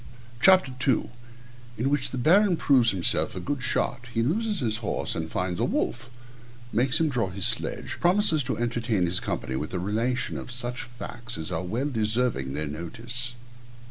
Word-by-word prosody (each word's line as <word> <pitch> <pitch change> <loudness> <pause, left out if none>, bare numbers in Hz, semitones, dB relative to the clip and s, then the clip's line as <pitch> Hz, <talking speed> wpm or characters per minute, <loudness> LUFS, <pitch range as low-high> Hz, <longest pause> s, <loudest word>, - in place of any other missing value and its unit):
CHAPTER 185 -5 +6
II 130 -2 0 0.7
_In 120 - -1
which 140 -1 +1
the 130 - -5
Baron 180 - +4
proves 130 -7 +4
himself 95 -4 0
a - - -3
good 140 +9 -3
shot 125 -1 -1
He 115 -1 +1
loses 210 - 0
his 110 -4 0
horse, 110 -3 -2
and 80 0 -3
finds 90 0 -2
a - - +1
wolf - - -1 0.6
Makes 130 +5 +2
him 165 - +3
draw 120 -9 0
his 95 +1 -3
sledge - - -1
Promises 175 -3 +3
to 130 - -2
entertain 115 -4 0
his 90 +1 +1
company 65 - -3
with 75 +7 -3
a - - 0
relation 115 +7 -1
of - - -8
such 125 0 -3
facts 120 0 -7
as 80 +2 -4
are 80 - -1
well 115 +10 -2
deserving 110 - 0
their 75 +2 -2
notice. 115 - -2
120 Hz, 175 wpm, -26 LUFS, 95-135 Hz, 0.7 s, CHAPTER